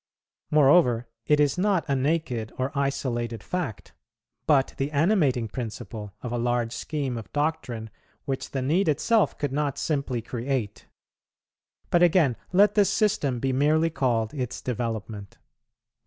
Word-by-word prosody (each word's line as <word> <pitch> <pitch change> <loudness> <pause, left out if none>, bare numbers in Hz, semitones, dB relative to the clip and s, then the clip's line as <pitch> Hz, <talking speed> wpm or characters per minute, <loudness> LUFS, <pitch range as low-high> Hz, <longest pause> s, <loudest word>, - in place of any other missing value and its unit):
Moreover, 135 -5 +4 0.2
it 150 0 +4
is 145 +2 +2
not 195 -3 +2
a 140 - +1
naked 130 -5 -1
or 130 +2 -1
isolated 120 -5 -2
fact, 175 - -4 0.5
but 140 -3 +3
the 135 +1 -1
animating 150 - +2
principle 110 -3 -7
of 120 - -4
a 120 - -1
large 120 -1 0
scheme 140 -5 -3
of 110 - -11
doctrine 145 -8 -2 0.3
which 135 -2 -3
the 135 -2 -3
need 170 +8 +2
itself 215 - +2
could 145 -3 -2
not 145 -1 -1
simply 140 -6 -2
create; 120 -3 -3 1.0
but 175 - +4
again, 165 -7 +4 0.2
let 200 +2 +5
this 205 -3 +4
system 150 - +1
be 135 +1 0
merely 155 +4 +2
called 120 -6 0
its 125 -5 -4
development. 110 -4 -4
135 Hz, 140 wpm, -26 LUFS, 120-155 Hz, 1.0 s, let